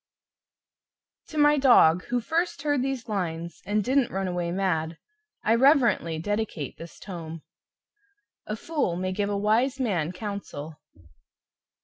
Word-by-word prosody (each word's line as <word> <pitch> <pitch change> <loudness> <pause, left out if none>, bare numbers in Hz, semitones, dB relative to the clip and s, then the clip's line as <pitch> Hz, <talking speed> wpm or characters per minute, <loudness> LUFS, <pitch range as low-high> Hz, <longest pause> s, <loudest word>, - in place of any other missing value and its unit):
To 310 - -8
MY 295 0 +5
DOG, 180 - +5
Who 245 0 -1
first 325 +3 -1
heard 290 -3 +1
these 265 -2 -3
lines 170 -5 -4
And 210 +1 +1
didn't 260 +2 +2
run 195 0 -2
away 175 -1 -2
MAD, 170 -4 -1 0.5
I 220 - +3
Reverently 240 - +3
Dedicate 205 - -3
This 165 0 -10
Tome 165 -4 -8 1.0
"A 215 - -2
Fool 280 - -1
may 185 +1 -2
give 200 +2 -1
a 205 - -1
Wise 230 +7 +1
Man 180 - 0
counsel." 180 -6 -7
205 Hz, 130 wpm, -26 LUFS, 170-255 Hz, 1.0 s, MY